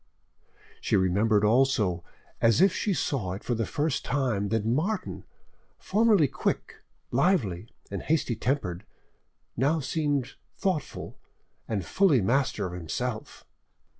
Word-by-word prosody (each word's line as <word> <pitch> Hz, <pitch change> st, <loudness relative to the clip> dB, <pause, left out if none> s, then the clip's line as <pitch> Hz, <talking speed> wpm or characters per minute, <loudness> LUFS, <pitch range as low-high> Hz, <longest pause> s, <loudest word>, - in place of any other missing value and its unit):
She -, -, +1 dB
remembered 100 Hz, +3 st, +2 dB
also, 110 Hz, -7 st, +2 dB, 0.4 s
as 115 Hz, +1 st, +4 dB
if 190 Hz, 0 st, +5 dB
she 210 Hz, -, -1 dB
saw 125 Hz, -, -1 dB
it 95 Hz, -, -7 dB
for 125 Hz, -, -1 dB
the 115 Hz, -1 st, -1 dB
first 150 Hz, -2 st, -1 dB
time, 120 Hz, -7 st, 0 dB
that 110 Hz, -1 st, 0 dB
Martin, 160 Hz, -, -1 dB, 0.5 s
formerly 210 Hz, -6 st, +3 dB
quick, -, -, -3 dB, 0.3 s
lively, 120 Hz, -, +1 dB, 0.2 s
and 100 Hz, -, -3 dB
hasty 150 Hz, -6 st, 0 dB
tempered, 110 Hz, -7 st, -2 dB, 0.7 s
now 145 Hz, +7 st, +2 dB
seemed 145 Hz, -2 st, -1 dB, 0.2 s
thoughtful, 185 Hz, -, -3 dB, 0.5 s
and 100 Hz, -6 st, -2 dB
fully 165 Hz, -, +3 dB
master 120 Hz, 0 st, +1 dB
of 90 Hz, -, -5 dB
himself. 110 Hz, +7 st, -5 dB
125 Hz, 120 wpm, -27 LUFS, 105-150 Hz, 0.7 s, if